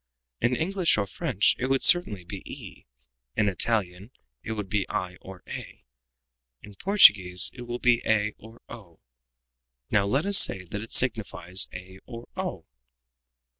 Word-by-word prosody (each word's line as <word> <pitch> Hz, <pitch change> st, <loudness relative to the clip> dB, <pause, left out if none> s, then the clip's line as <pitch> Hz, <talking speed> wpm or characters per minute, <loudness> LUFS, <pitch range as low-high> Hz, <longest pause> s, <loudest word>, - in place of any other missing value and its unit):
In 120 Hz, +2 st, 0 dB
English 175 Hz, -, 0 dB
or 105 Hz, -, 0 dB
French 95 Hz, -, 0 dB
it 130 Hz, -, -2 dB
would 135 Hz, 0 st, 0 dB
certainly 110 Hz, -, +4 dB
be 95 Hz, +2 st, -9 dB
e, -, -, -12 dB, 0.5 s
in 105 Hz, -, +1 dB
Italian 100 Hz, -1 st, -1 dB, 0.3 s
it 110 Hz, -, -6 dB
would 105 Hz, -3 st, -5 dB
be 100 Hz, 0 st, -2 dB
i 90 Hz, 0 st, -4 dB
or 95 Hz, -1 st, -13 dB
a, -, -, -9 dB, 0.8 s
in 105 Hz, -, -12 dB
Portuguese 100 Hz, -, +4 dB
it 120 Hz, -2 st, -10 dB
will 120 Hz, 0 st, -4 dB
be 125 Hz, -1 st, +2 dB
a 105 Hz, -1 st, 0 dB
or 115 Hz, +2 st, -15 dB
o. 95 Hz, -8 st, -13 dB, 0.9 s
Now 100 Hz, -1 st, +2 dB
let 135 Hz, -, 0 dB
us 200 Hz, 0 st, +4 dB
say 95 Hz, -, +3 dB
that 100 Hz, +3 st, -7 dB
it 110 Hz, -, -9 dB
signifies 100 Hz, -7 st, +2 dB
a 95 Hz, +1 st, -11 dB
or 115 Hz, 0 st, -10 dB
_o." -, -, -5 dB
105 Hz, 155 wpm, -25 LUFS, 95-120 Hz, 0.9 s, certainly